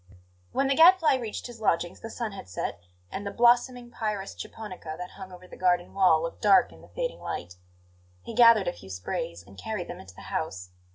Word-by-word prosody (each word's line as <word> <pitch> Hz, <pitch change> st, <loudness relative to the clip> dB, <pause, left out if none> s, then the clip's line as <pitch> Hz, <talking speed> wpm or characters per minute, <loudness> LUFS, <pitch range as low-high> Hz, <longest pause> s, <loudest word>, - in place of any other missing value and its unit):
When 275 Hz, -, +1 dB
the 270 Hz, -, +3 dB
Gadfly 330 Hz, 0 st, +7 dB
reached 230 Hz, -4 st, -5 dB
his 240 Hz, -2 st, -9 dB
lodgings 175 Hz, -3 st, 0 dB
the 225 Hz, -, -7 dB
sun 230 Hz, -1 st, -4 dB
had 195 Hz, -, -10 dB
set, 85 Hz, -, -4 dB, 0.3 s
and 200 Hz, -, -4 dB
the 200 Hz, -, -3 dB
blossoming 240 Hz, +2 st, +3 dB
pyrus 210 Hz, -4 st, -3 dB
japonica 185 Hz, -7 st, -8 dB
that 180 Hz, +1 st, -7 dB
hung 190 Hz, -1 st, -10 dB
over 180 Hz, 0 st, -12 dB
the -, -, -12 dB
garden 180 Hz, -1 st, +1 dB
wall 180 Hz, -5 st, +4 dB
looked 165 Hz, -, -5 dB
dark 210 Hz, +4 st, +5 dB
in -, -, -16 dB
the -, -, -15 dB
fading -, -, -4 dB
light. 90 Hz, +1 st, -6 dB, 0.7 s
He -, -, -7 dB
gathered 230 Hz, -3 st, +6 dB
a 175 Hz, -, 0 dB
few 95 Hz, -, -13 dB
sprays 90 Hz, -1 st, -4 dB
and 100 Hz, +1 st, -14 dB
carried 210 Hz, -, -4 dB
them -, -, -7 dB
into 95 Hz, -1 st, -13 dB
the -, -, -12 dB
house. 90 Hz, 0 st, -3 dB
200 Hz, 210 wpm, -27 LUFS, 170-235 Hz, 0.7 s, Gadfly